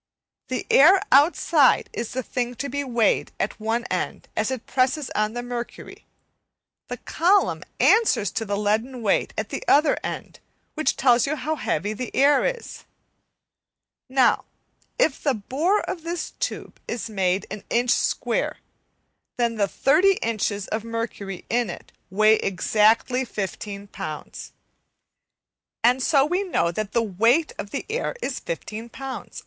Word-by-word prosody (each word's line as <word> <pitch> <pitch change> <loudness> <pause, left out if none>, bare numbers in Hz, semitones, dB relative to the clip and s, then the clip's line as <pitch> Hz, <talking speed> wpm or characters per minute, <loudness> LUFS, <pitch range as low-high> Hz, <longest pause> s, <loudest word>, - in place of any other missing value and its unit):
The 255 - -3
air 365 +8 +7
outside 290 0 +4
is 235 - -4
the 260 0 -2
thing 245 0 -3
to 280 +4 -4
be 285 +2 -2
weighed 235 -5 +1
at - - -2
one 225 +2 -1
end - - -3
as - - 0
it 260 -3 -4
presses 265 +2 0
on 215 +1 0
the 240 0 -4
mercury, 245 -1 -7 0.8
the - - -5
column 380 +4 +1 0.2
answers 430 - +4
to 225 - -2
the 205 -2 -2
leaden 225 +4 -1
weight 200 - +1
at - - -2
the - - -5
other 300 +2 +5
end - - -6 0.3
which 310 - 0
tells 245 -1 +4
you 305 - 0
how 305 +2 -2
heavy 205 - -2
the 245 +3 -5
air 280 +1 +4
is. - - -4 1.3
Now 260 -1 +3 0.5
if 320 - +1
the 275 -4 +1
bore 300 - 0
of 345 - -5
this 340 +2 -4
tube - - -4
is 230 -1 -4
made 190 -3 0
an 210 -1 -6
inch 240 +1 +2
square, - - 0 0.8
then 235 -1 +1
the 200 -2 +2
30 315 - +3
inches 210 -3 -1
of 220 0 -2
mercury 230 -4 -5
in 240 -3 0
it - - -9 0.2
weigh 215 +3 +4
exactly 215 +6 +2
15 200 -2 -6
lbs, - - -7 1.3
and 250 +3 +4
so 275 0 +4
we 355 +5 0
know 355 - 0
that 210 +3 -4
the 235 - +2
weight 230 - +2
of 200 - -5
the 275 - -4
air 465 +3 -2
is - - -2
15 230 - -6
lbs. 265 +2 -7
245 Hz, 150 wpm, -24 LUFS, 215-285 Hz, 1.3 s, air